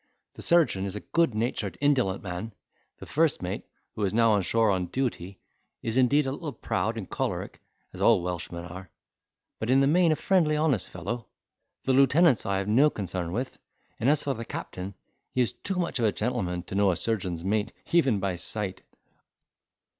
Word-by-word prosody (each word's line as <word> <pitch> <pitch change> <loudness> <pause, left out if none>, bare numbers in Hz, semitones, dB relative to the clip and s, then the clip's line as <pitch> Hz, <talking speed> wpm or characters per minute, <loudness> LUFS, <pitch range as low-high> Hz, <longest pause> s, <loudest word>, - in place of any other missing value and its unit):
The - - -11
surgeon 165 - +3
is 100 0 -5
a - - -3
good 165 -9 +1
natured, 110 -5 -2
indolent 130 -10 +2
man; 95 +4 -5 0.4
the - - -10
first 155 - +1
mate 90 +2 -4 0.3
(who 105 - -3
is 100 +1 0
now 115 -1 +5
on 105 -2 +3
shore 110 +4 +3
on 90 -2 0
duty) 100 -8 -3 0.5
is 115 0 -2
indeed 130 +3 +4
a 135 - -1
little 150 +1 -5
proud - - -2
and - - -5
choleric, - - -3 0.3
as - - -8
all 85 - +5
Welshmen 85 -1 -4
are, 90 +1 -9 0.7
but 110 - -3
in 130 +1 +5
the 135 - +4
main 165 +3 +4
a - - +3
friendly 165 -3 +2
honest 150 -8 +1
fellow. 110 +7 -5 0.6
The 135 - +2
lieutenants 140 - +4
I 100 -1 +1
have 95 +1 -2
no 130 +8 +5
concern 90 - -4
with; 125 +7 -4 0.4
and, 120 - +2
as 150 0 +3
for 140 - 0
the 115 - -6
captain, 95 -3 -6 0.4
he 130 - +2
is 120 - +1
too 195 - -3
much 170 -6 -1
of 115 - +2
a 105 - +3
gentleman 90 -7 -2
to - - -10
know 100 0 +3
a 90 - +2
surgeon's 90 -5 -2
mate, 105 +2 0 0.2
even 135 -11 +3
by 95 -2 -1
sight." 95 +3 -3
110 Hz, 190 wpm, -27 LUFS, 95-135 Hz, 0.7 s, now